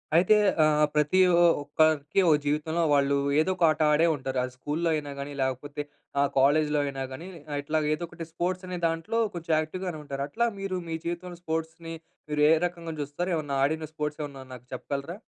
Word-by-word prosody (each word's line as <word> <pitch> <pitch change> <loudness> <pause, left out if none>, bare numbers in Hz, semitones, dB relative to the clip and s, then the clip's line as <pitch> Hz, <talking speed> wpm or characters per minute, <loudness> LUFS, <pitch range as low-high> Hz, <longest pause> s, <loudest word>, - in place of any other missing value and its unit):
అయితే 180 +5 +6 0.3
ఆహ్, 150 0 +4
ప్రతి 150 +5 +3 0.4
ఒక్కరికి 150 +2 +2
ఒక 155 - +6
జీవితంలో, 155 +3 0
వాళ్ళు 140 -1 +3 0.2
ఏదో 175 +4 +2
ఒక 180 - -2
ఆట 155 0 0
ఆడే 155 +3 +4
ఉంటారు. 135 -1 -4
అది 125 0 -5
స్కూల్‌లో 155 +5 -1
అయినా 150 -2 -3
గాని, 140 +1 -5
లేకపోతే 130 +3 -2 0.4
ఆహ్, 140 0 +3
కాలేజ్‌లో 150 +2 +3
అయినా 135 -1 -4
గాని, 130 +6 -7 0.4
ఇట్లా 155 +2 0
ఏదో 155 +3 -3
ఒకటి 165 0 -8
స్పోర్ట్స్ 180 +3 -2
అనే 180 0 -4
దాంట్లో 165 +8 -2 0.2
కొంచెం 165 -2 -2
యాక్టివ్‌ 155 +4 -4
గానే 165 -3 -4
ఉంటారు. 140 -1 -4
అట్లా 235 +9 +1
మీరు 195 -1 -2
మీ 165 - -2
జీవితంలో 175 +1 -4
స్పోర్ట్స్‌ని 165 0 -4 0.4
మీరు 150 0 +1
ఏ - - +6
రకంగా 170 -2 -5
చూస్తారు? 145 +6 -3
ఏమన్నా 145 -3 -2
ఆడిన 155 +2 -2
స్పోర్ట్స్ 150 0 -3
ఏమన్నా 140 -2 -8
నాకు 125 -1 -11
చెప్పగలరా? 140 +7 -4
155 Hz, 180 wpm, -27 LUFS, 145-170 Hz, 0.4 s, అయితే